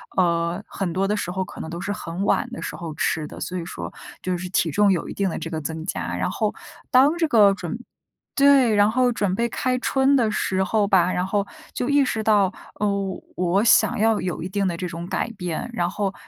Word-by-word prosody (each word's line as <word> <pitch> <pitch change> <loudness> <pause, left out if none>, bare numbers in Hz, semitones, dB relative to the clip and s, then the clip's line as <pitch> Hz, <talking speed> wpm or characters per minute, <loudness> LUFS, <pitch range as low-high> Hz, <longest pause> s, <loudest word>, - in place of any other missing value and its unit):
呃， 170 +1 +1
很 185 -4 -3
多 190 +2 +1
的 210 +1 0
时 180 - -3
候， 190 +1 -1
可 - - -11
能 160 - -5
都 170 +1 -6
是 205 - -3
很 185 -3 -4
晚 245 +5 +1
的 245 - -6
时 - - -5
候 165 -2 -6
吃 155 0 -1
的， - - -10
所 185 - -4
以 170 - -4
说， - - -6 0.3
就 185 -1 -1
是 180 +1 -5
体 175 -2 +1
重 205 +6 +4
有 180 - -1
一 - - -5
定 195 -1 0
的 - - -4
这 165 - -5
个 160 -2 -3
增 160 +1 -5
加。 - - -3
然 - - -1
后 - - -1 0.4
当 280 +5 +5
这 330 -1 +2
个 210 -7 +6
准 195 +3 -5 0.6
对， 275 -5 +5
然 205 +1 +4
后 250 +1 +2
准 205 -4 0
备 235 +5 +1
开 255 +2 -1
春 265 +2 +2
的 230 -4 +2
时 190 -2 0
候 210 +2 +2
吧， 185 -2 +3
然 180 - 0
后 200 +1 -1 0.3
就 245 - -2
意 285 0 +4
识 225 -4 -1
到， 205 -3 +3 0.3
呃， - - +3 0.5
我 180 +3 +2
想 220 -3 +4
要 220 0 +3
有 180 -3 -3
一 180 - -4
定 200 0 0
的 175 - -1
这 180 +1 -4
种 170 0 -6
改 215 - -2
变。 180 +2 -4
然 175 -6 0
后 200 0 -2
195 Hz, 255 characters per minute, -23 LUFS, 175-220 Hz, 0.6 s, 个